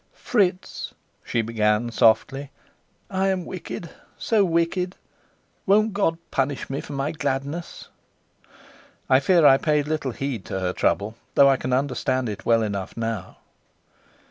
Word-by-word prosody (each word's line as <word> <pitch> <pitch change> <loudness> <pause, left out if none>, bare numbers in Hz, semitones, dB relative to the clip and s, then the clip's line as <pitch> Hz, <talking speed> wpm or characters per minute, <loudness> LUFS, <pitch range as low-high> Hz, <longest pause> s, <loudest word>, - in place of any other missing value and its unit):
"Fritz," 190 -6 -1 0.3
she 115 - -1
began 110 +1 +1
softly, 130 +5 +2 0.6
"I 190 0 +1
am 185 -2 0
wicked 175 -2 -7 0.3
so 220 -3 +2
wicked. 180 +1 0 0.7
Won't 215 +2 +4
God 180 -5 +1
punish 135 0 -1
me 135 - -2
for 145 - -9
my 140 +2 -1
gladness?" 145 +2 -4 1.2
I 130 - +7
fear 170 +3 +4
I 135 - +8
paid 150 -2 +1
little 155 -3 -1
heed 135 -7 -4
to 95 - -3
her 90 -1 -1
trouble, 105 +4 0 0.2
though 140 0 +7
I 135 - +4
can 130 - -4
understand 130 -1 0
it 105 +2 -7
well 115 -1 +4
enough 100 -2 -4
now. 115 -5 -4
140 Hz, 140 wpm, -24 LUFS, 115-170 Hz, 1.2 s, I